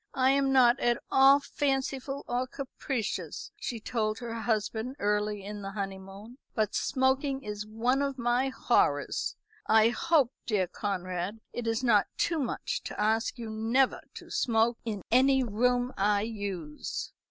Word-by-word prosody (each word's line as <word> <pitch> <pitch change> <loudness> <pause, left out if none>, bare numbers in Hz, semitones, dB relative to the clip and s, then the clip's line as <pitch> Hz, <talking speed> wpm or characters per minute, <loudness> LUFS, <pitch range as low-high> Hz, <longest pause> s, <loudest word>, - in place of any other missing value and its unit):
"I 260 0 +4
am 275 0 +2
not 255 -1 +5
at 240 0 +2
all 270 +1 +7
fanciful 275 -1 -2
or 250 +1 -1
capricious," 255 -3 -4
she 240 -4 -5
told 215 -1 -1
her 235 -2 -6
husband 225 +2 -2
early 210 -3 0
in 205 0 -6
the 195 - -5
honeymoon, 195 +4 -7 0.2
"but 215 -2 0
smoking 265 +1 +1
is 210 -1 -5
one 240 +5 +1
of 275 -1 -1
my 240 +2 +1
horrors. - - +1 0.3
I 220 0 +6
hope, 295 -1 +2 0.2
dear 205 -5 +2
Conrad, 185 +1 -3
it 240 -1 -4
is 225 +2 0
not 215 -5 +4
too 335 -2 +1
much 300 - -2
to - - -6
ask 220 +4 +1
you 230 -2 -6
never 230 +5 +1
to - - -10
smoke 230 0 +2
in 210 -5 -4
any 265 +2 +5
room 245 +3 +1
I 205 +1 +2
use." 200 -8 -5
235 Hz, 150 wpm, -29 LUFS, 210-265 Hz, 0.3 s, all